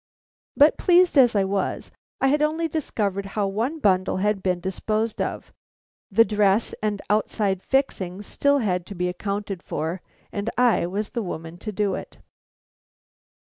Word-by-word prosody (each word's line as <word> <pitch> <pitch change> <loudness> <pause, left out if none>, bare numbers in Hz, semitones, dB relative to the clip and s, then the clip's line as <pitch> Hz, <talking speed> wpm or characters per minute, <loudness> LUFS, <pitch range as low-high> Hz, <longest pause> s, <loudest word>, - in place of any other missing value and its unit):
But 295 +2 +5
pleased 355 -1 +4
as 245 -5 +6
I 200 - +3
was, 195 +1 -2 0.3
I 270 - +3
had 295 +2 +2
only 315 +2 +1
discovered 205 - -2
how 205 - +2
one 225 +11 -1
bundle 185 -11 +2
had 205 +1 0
been 180 -2 0
disposed 215 +4 -2
of. - - -4 0.6
The 230 - +5
dress 210 0 +2
and 210 -1 -2
outside 205 -2 0
fixings 205 -8 -1
still 285 +6 +2
had 180 -8 -1
to 200 - -8
be 180 0 -1
accounted 200 +1 -4
for, 165 +3 -4 0.3
and 205 +2 -3
I 240 -7 +3
was 205 +4 -3
the 235 - -3
woman 165 -3 -6
to 215 - -5
do 205 0 0
it. - - -7
205 Hz, 155 wpm, -24 LUFS, 190-240 Hz, 0.6 s, as